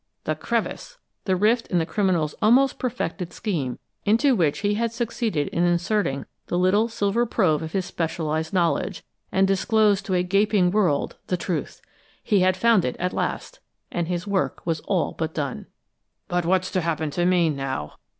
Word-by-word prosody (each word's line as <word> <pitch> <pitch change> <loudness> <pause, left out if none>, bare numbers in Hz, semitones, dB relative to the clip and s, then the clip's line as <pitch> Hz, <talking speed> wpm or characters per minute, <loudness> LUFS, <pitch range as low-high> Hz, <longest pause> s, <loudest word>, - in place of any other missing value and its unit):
The - - 0
crevice! - - -3 0.3
The 190 - +2
rift 220 +5 +2
in 180 - 0
the 165 - +2
criminal's 175 -6 0
almost 250 +5 +4
perfected 190 -8 -3
scheme, 160 - -3 0.3
into 235 +6 +3
which 160 -8 +1
he 205 0 +1
had 230 +2 0
succeeded 230 - -1
in 170 - 0
inserting 175 -5 0 0.2
the 175 - -1
little 190 +5 +3
silver 225 0 0
probe 175 -9 +2
of 160 0 -6
his 190 -2 0
specialized 160 -2 -2
knowledge, 180 +1 0 0.3
and 190 0 +3
disclosed 205 +1 +2
to 190 - +1
a 180 - +2
gaping 195 0 +2
world 180 -9 +1
the 180 - 0
truth! 175 -1 -4 0.4
He 205 - +3
had 185 0 +3
found 225 -2 +4
it 125 - -2
at 180 +1 -2
last, - - -3 0.3
and 170 -1 -2
his 175 -1 -2
work 200 -2 -1
was 165 -2 0
all 185 -5 0
but 160 -1 -4
done. 140 - -3 0.6
"But 175 -1 -1
what's 185 +1 +1
to 185 - 0
happen 160 -2 -1
to 175 +4 0
me 175 -3 +3
now?" 135 - -4
185 Hz, 175 wpm, -24 LUFS, 165-210 Hz, 0.6 s, almost